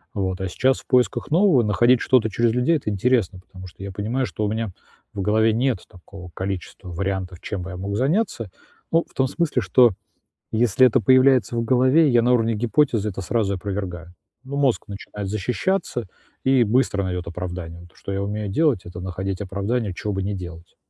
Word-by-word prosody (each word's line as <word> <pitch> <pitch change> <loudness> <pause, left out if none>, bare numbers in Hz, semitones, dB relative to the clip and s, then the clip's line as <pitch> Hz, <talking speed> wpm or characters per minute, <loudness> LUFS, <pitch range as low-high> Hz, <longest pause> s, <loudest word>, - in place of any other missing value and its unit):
Вот. 95 -2 -2
А 95 - -1
сейчас 130 +8 +1
в - - -28
поисках 125 -1 +1
нового 170 - +4
находить 120 +3 +3
что-то 120 -4 +3
через 115 +3 +2
людей- 125 +7 +2
это 130 - -4
интересно, 105 -2 +1
потому 95 0 -12
что 90 +2 -12
я 100 - -5
понимаю, 110 +7 -2
что 110 - -4
у - - 0
меня 110 -1 -2 0.4
в 100 - -4
голове 110 +3 +3
нет 125 -2 +1
такого 90 0 -13
количества 95 0 -5
вариантов, 95 0 -3
чем 100 - -4
бы 95 - -7
я 90 - -7
мог 100 +2 -4
заняться. 150 - 0 0.4
Ну, 165 +1 +3
в - - -25
том 130 - +1
смысле, 165 +4 0
что 125 -3 +5 0.6
если 120 +2 +4
это 125 +1 +3
появляется 130 +1 +4
в 115 - +1
голове, 130 +6 +4
я 120 -3 +4
на 125 +1 +3
уровне 115 -2 +2
гипотезы 115 -1 +1
это 95 - -6
сразу 100 0 0
опровергаю. 90 -3 -5 0.3
Ну, 140 +2 -6
мозг 140 -4 +1
начинает 100 0 -7
защищаться 120 - -2 0.4
и 130 -2 +4
быстро 110 -3 +1
найдёт 90 -2 -3
оправдание. 90 -1 -6
Но - - -13
то, - - -28
что 100 - -6
я 100 0 -2
умею 105 +1 -3
делать- 125 - +1
это 90 0 -8
находить 95 +1 -4
оправдание, 100 +3 -2
чего 105 +3 -4
бы 95 - -2
не 100 +2 -2
делать. 85 -3 -9
105 Hz, 195 wpm, -22 LUFS, 95-125 Hz, 0.6 s, что